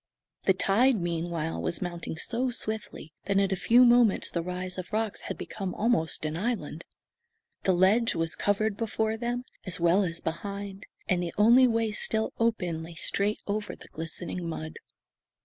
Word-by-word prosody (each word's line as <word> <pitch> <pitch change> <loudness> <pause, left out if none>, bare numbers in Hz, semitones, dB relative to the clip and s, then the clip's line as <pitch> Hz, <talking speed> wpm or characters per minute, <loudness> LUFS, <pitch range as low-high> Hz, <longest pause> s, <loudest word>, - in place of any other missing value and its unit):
The 190 - +4
tide, 220 +6 +3
meanwhile, 170 - -2
was 85 +1 -1
mounting 175 -2 -5
so 245 +8 -1
swiftly 220 -8 -5
that 200 +1 +1
in 195 -1 +3
a - - +2
few 230 +7 +5
moments 240 -4 +4
the 170 - -1
rise 180 +1 -4
of 180 - -7
rocks 220 -1 -1
had - - -4
become 195 -4 -5
almost 205 -9 0
an 155 +1 -2
island. 175 -6 -3 0.8
The 190 - +4
ledge 200 +6 +3
was 165 0 -1
covered 205 0 0
before 220 -1 -1
them 240 +2 -2 0.2
as 185 -2 -4
well 175 +4 +4
as 170 -2 -3
behind, 200 +4 -5 0.2
and 180 -1 +1
the 170 -1 -4
only 235 +5 +7
way 225 -2 +1
still 220 +1 0
open 180 -8 0
lay 165 +1 -9
straight 200 +5 0
over 210 +1 -3
the - - -15
glistening 165 +2 -4
mud. 160 -1 -6
195 Hz, 165 wpm, -28 LUFS, 170-220 Hz, 0.8 s, only